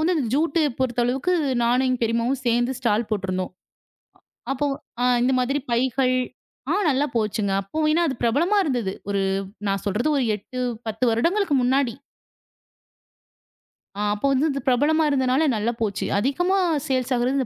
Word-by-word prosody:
வந்து 345 +3 +2 0.2
ஜூட் 320 +2 +1 0.2
பொறுத்த 245 -2 0
அளவுக்கு 270 +9 0 0.3
நானும் 250 +2 +2
எங்க 255 -1 0
பெரியம்மாவும் 235 +3 0
சேர்ந்து 240 +2 +2
ஸ்டால் 225 -2 0
போட்டுருந்தோம். 185 -3 -2 1.0
அப்போ 290 +2 -1 0.6
இந்த 255 - +2
மாதிரி 275 +3 0
பைகள் 255 +1 +1 0.6
ஆ - - +2 0.2
நல்லா 280 +2 +1
போச்சுங்க. 210 -2 0
அப்ப 310 +11 -3 0.2
அது 270 - -1
பிரபலமா 335 - +2
இருந்தது. 240 -9 -1 0.2
ஒரு 200 -1 0 0.5
நான் 195 +1 -1
சொல்றது 210 +9 0
ஒரு 255 - +1
8,10 235 +1 -4
வருடங்களுக்கு 335 - +1
முன்னாடி. 255 -1 +1 2.0
ஆ - - -2
அப்போ 210 +7 -1
வந்து 275 +4 +2
இது 275 - -3
பிரபலமா 295 +6 +3
இருந்ததுனால 265 +1 +2
நல்லா 220 +3 0
போச்சு. 205 -3 -1
அதிகமா 355 - +1 0.3
சேல்ஸ் 260 -1 -1
ஆகிறது 255 +2 +1
255 Hz, 135 wpm, -23 LUFS, 230-275 Hz, 2.0 s, பிரபலமா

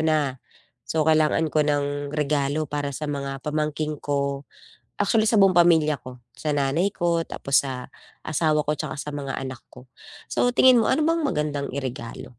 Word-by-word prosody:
na, 150 -5 0 0.5
so 160 -1 +1
kailangan 155 0 +2
ko 155 - +3
ng 145 -1 -1
regalo 150 +1 0
para 145 0 -3
sa 155 - -5
mga 140 -2 -4
pamangkin 150 0 -2
ko, 140 -1 -2 0.5
actually 220 +2 +2
sa 215 -2 +4
buong 185 -2 +5
pamilya 160 -4 +4
ko, 125 -1 -12 0.2
sa 150 -1 -1
nanay 145 +8 0
ko, 170 -1 0
tapos 140 0 +1
sa 130 -1 -6 0.3
asawa 155 0 +1
ko, 150 0 -2
'tsaka - - -4
sa 150 - -5
mga 140 -2 -5
anak 130 -2 -6 0.2
ko. 125 0 -15 0.4
So 245 0 +1
tingin 255 -1 +6
mo 225 - +2
ano 305 +3 +2
bang 330 0 +1
magandang 150 - -2
iregalo? 125 -3 -6
150 Hz, 170 wpm, -24 LUFS, 140-160 Hz, 0.5 s, tingin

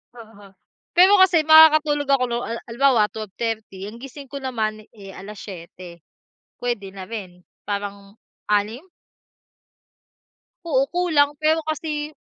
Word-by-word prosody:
Oo, 220 -3 -14 0.5
pero 370 +3 +7
kasi 345 -4 +5
makakatulog 310 -2 +6
ako 275 -2 +3
lo 235 - 0
ha 230 - -4
halimbawa 235 -3 +2
12:30 215 -2 -5
ang 215 +3 -9
gising 275 +1 -10
ko 280 - -5
naman, 220 -5 -3
eh, 195 -2 -11
7:00 185 -3 -10 0.6
puwede 210 -6 -3
na 190 0 -9
rin, 185 -6 -8 0.2
parang 200 0 -6 0.3
6? 210 - -1 1.8
Oo 270 -5 +2
kulang 315 -5 +2
pero 315 +1 +3
kasi 305 -1 -4
230 Hz, 115 wpm, -22 LUFS, 205-295 Hz, 1.8 s, pero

